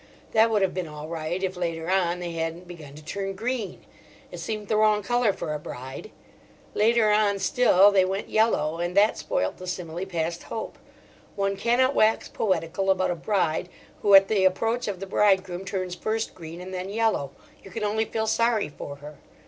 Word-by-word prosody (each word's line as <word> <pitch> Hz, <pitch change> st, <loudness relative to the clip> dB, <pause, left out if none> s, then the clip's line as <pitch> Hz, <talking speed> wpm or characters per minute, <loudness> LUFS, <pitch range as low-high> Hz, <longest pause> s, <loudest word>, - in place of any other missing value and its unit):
That 225 Hz, +1 st, +4 dB
would 210 Hz, -3 st, +2 dB
have 190 Hz, -, +1 dB
been 180 Hz, -2 st, -3 dB
all 150 Hz, 0 st, -8 dB
right 165 Hz, +3 st, -3 dB
if 190 Hz, 0 st, -1 dB
later 165 Hz, -2 st, -3 dB
on 180 Hz, -2 st, +1 dB
they 175 Hz, -1 st, -4 dB
hadn't 165 Hz, +2 st, -4 dB
begun 155 Hz, -5 st, -11 dB
to 150 Hz, 0 st, -13 dB
turn 195 Hz, +3 st, -4 dB
green: 230 Hz, 0 st, -4 dB, 0.5 s
it -, -, -8 dB
seemed 215 Hz, -2 st, -4 dB
the 215 Hz, -, +1 dB
wrong 215 Hz, -1 st, +3 dB
colour 240 Hz, 0 st, +2 dB
for 155 Hz, -5 st, -4 dB
a 150 Hz, -, -3 dB
bride. 130 Hz, +7 st, -8 dB, 0.6 s
Later 220 Hz, 0 st, +3 dB
on 210 Hz, -1 st, +3 dB
still 205 Hz, -2 st, +5 dB
they 195 Hz, -2 st, +4 dB
went 190 Hz, +2 st, -2 dB
yellow, 165 Hz, -8 st, +1 dB
and 175 Hz, +2 st, -2 dB
that 210 Hz, +2 st, +4 dB
spoilt -, -, -1 dB
the 185 Hz, -, -9 dB
simile 180 Hz, 0 st, -4 dB
past 170 Hz, -1 st, -2 dB
hope. 220 Hz, -, -6 dB, 0.6 s
One 195 Hz, 0 st, 0 dB
cannot 240 Hz, +6 st, +2 dB
wax 220 Hz, -3 st, +3 dB
poetical 185 Hz, -1 st, -1 dB
about 190 Hz, -1 st, +2 dB
a -, -, -1 dB
bride 175 Hz, -2 st, -1 dB, 0.3 s
who 200 Hz, -1 st, +6 dB
at 195 Hz, 0 st, +8 dB
the 200 Hz, -2 st, +2 dB
approach 225 Hz, +6 st, +1 dB
of 195 Hz, -3 st, -3 dB
the -, -, -3 dB
bridegroom 190 Hz, -2 st, +1 dB
turns 185 Hz, -2 st, -3 dB
first 220 Hz, +5 st, -2 dB
green 165 Hz, 0 st, -9 dB
and 185 Hz, +1 st, -8 dB
then 185 Hz, +1 st, -4 dB
yellow: 215 Hz, -9 st, 0 dB, 0.3 s
you -, -, -11 dB
can 210 Hz, +3 st, -5 dB
only 215 Hz, +1 st, 0 dB
feel 220 Hz, 0 st, -2 dB
sorry 230 Hz, -2 st, +1 dB
for 145 Hz, -1 st, -8 dB
her. 145 Hz, +1 st, -11 dB
190 Hz, 195 wpm, -25 LUFS, 170-215 Hz, 0.6 s, at